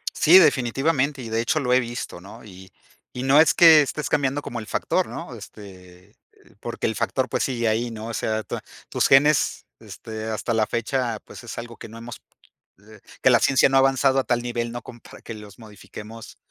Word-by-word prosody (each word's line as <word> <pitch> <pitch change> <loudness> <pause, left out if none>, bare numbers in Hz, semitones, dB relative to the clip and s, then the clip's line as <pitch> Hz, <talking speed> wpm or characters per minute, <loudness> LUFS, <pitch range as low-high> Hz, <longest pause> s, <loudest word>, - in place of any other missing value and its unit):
Sí, 170 +4 +6
definitivamente. 140 -1 +1
Y 115 - -7
de 115 +1 0
hecho 120 +6 0
lo 125 -4 0
he 130 - +5
visto, 120 -6 -6
¿no? 105 +5 -13
Y 95 -2 -14 0.4
y 125 - -5
no 135 +3 +6
es 160 - +4
que 160 -3 +8
estés 150 +1 -3
cambiando 140 0 0
como 120 -4 -6
el 110 - -11
factor, - - -1
¿no? - - -8
Este, 90 -3 -14 0.5
porque - - -3
el - - -3
factor, - - -1
pues, - - -1
sigue 120 -3 -1
ahí, 115 +2 -1
¿no? 110 0 -7
O 115 - -6
sea, 110 +1 -2
tua - - -6 0.3
tus - - +1
genes, 145 +2 +3
este 110 -1 -9
hasta 110 +1 -3
la 110 -1 +2
fecha 120 -1 -2
pues - - -12
es 120 - -8
algo 120 0 -8
que - - -10
no 115 - -11
hemos 115 0 -10 0.7
eh, 110 -1 -15 0.2
que 130 - +5
la 120 - +6
ciencia 135 +5 +4
no 135 - +1
ha - - +7
avanzado 135 0 +2
a 135 - +1
tal 120 0 0
nivel 120 -1 -3
no 120 0 -6
compara 120 0 -14
que 115 - -8
los 105 0 -13
modifiquemos, 110 +1 -12
120 Hz, 210 wpm, -23 LUFS, 110-135 Hz, 0.7 s, que